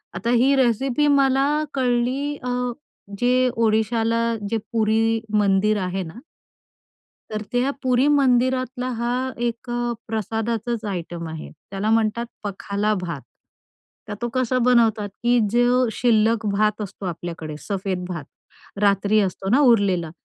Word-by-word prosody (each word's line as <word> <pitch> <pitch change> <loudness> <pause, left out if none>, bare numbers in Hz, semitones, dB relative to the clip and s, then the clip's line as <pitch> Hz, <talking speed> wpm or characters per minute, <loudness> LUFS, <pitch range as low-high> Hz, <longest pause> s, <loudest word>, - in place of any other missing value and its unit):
आता 230 - -2
ही 255 +3 +4
रेसिपी 265 +3 +2
मला 275 -1 +3 0.3
कळली 255 +3 0
अ, 250 - -3 0.7
जे 255 +1 +3
ओडिशाला 225 +1 +1 0.3
जे 225 - 0
पुरी 225 0 +1 0.2
मंदिर 205 +1 +2
आहे 185 +1 -2
ना 170 +7 -10 1.1
तर 215 0 -3
त्या 250 +3 +1
पुरी 255 +1 +3
मंदिरातला 255 -2 +2
हा 235 +1 -1 0.3
एक 235 +2 -6
अ, 240 0 -1
प्रसादाचंच 225 +1 -2
आयटम 170 -2 -5
आहे. 160 0 -7 0.2
त्याला 200 +2 -2
म्हणतात 225 +1 +1 0.2
पखाला 205 +1 -1
भात. 175 -2 -5 0.9
तर 215 - -5
तो 240 - -1
कसा 255 0 +1
बनवतात 225 -4 +3
की 240 0 +4
जो 245 +1 +3
शिल्लक 225 -1 +2
भात 210 +1 +1
असतो 200 -1 -7
आपल्याकडे, 165 -3 -5
सफेद 190 -1 -3
भात, 170 -5 -5 0.6
रात्री 200 +1 +3
असतो 195 -1 -2
ना 250 +7 +4
उरलेला. 200 - +3
225 Hz, 125 wpm, -22 LUFS, 200-245 Hz, 1.1 s, ही